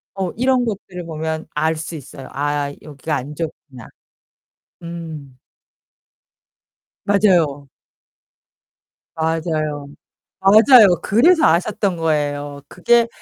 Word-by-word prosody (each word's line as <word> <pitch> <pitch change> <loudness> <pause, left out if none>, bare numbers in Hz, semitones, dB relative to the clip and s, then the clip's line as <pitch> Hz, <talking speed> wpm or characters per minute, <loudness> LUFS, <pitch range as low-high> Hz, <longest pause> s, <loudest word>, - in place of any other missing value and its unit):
어, 190 -2 -2
이런 255 +1 +1
것들을 190 -5 -6
보면 160 0 -4
알 160 +2 +1
수 160 +1 -6
있어요. 135 -2 -10
'아, 145 0 -2
여기가 150 +1 -5
안 140 +3 -5
좋구나.' 145 -6 -7 1.0
음. 160 -6 -8 1.7
맞아요. 175 -9 +2 1.5
맞아요. 160 -2 -2 0.5
맞아요. 220 +4 +7 0.2
그래서 315 - +4
아셨던 185 +3 +1
거예요. 145 -3 -2
그게 235 +6 +2
160 Hz, 190 characters per minute, -19 LUFS, 145-195 Hz, 1.7 s, 맞아요